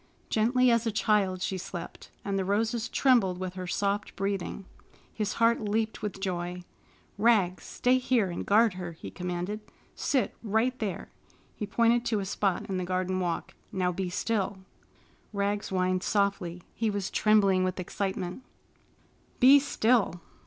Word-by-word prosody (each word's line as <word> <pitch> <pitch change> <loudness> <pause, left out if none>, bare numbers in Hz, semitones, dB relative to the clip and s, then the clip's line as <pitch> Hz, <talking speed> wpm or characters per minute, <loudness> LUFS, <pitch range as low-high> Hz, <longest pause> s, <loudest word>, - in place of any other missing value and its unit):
Gently 245 +3 +3
as 230 0 +2
a - - +1
child 200 -3 +1
she 190 -1 -2
slept, 175 -1 -8 0.2
and 200 -1 -1
the 195 - +1
roses 220 +4 0
trembled 230 -9 +3
with 185 -1 -4
her 185 -1 -6
soft 200 +2 -1
breathing. 195 0 -3 0.5
His 210 -2 -2
heart 230 0 +3
leaped 220 +1 -1
with 210 -2 -4
joy. 180 -2 -3 0.6
"Rags, 205 -5 +3
stay 255 +1 +2
here 240 -7 +1
and 170 - -4
guard 220 0 +4
her!" 180 -2 -6
he 160 - -9
commanded. 180 +3 -3 0.3
"Sit 265 -3 0
right 225 +3 +1
there!" 200 -6 -4 0.4
He 210 - -4
pointed 235 +3 +3
to 220 -3 +1
a 195 - -3
spot 195 -1 0
in 190 - -2
the 185 - -1
garden 185 +1 -1
walk. 175 -2 -2 0.2
"Now 185 -3 0
be 180 +1 -3
still." 205 +1 -1 0.8
Rags 200 0 -1
whined 185 -1 +1
softly. 195 -4 0
He 225 -1 0
was 200 -2 -3
trembling 200 -3 +4
with 185 0 -1
excitement. 190 +2 -3 1.0
"Be 270 +3 +8
still!" 230 - +2
200 Hz, 150 wpm, -28 LUFS, 185-220 Hz, 1.0 s, Be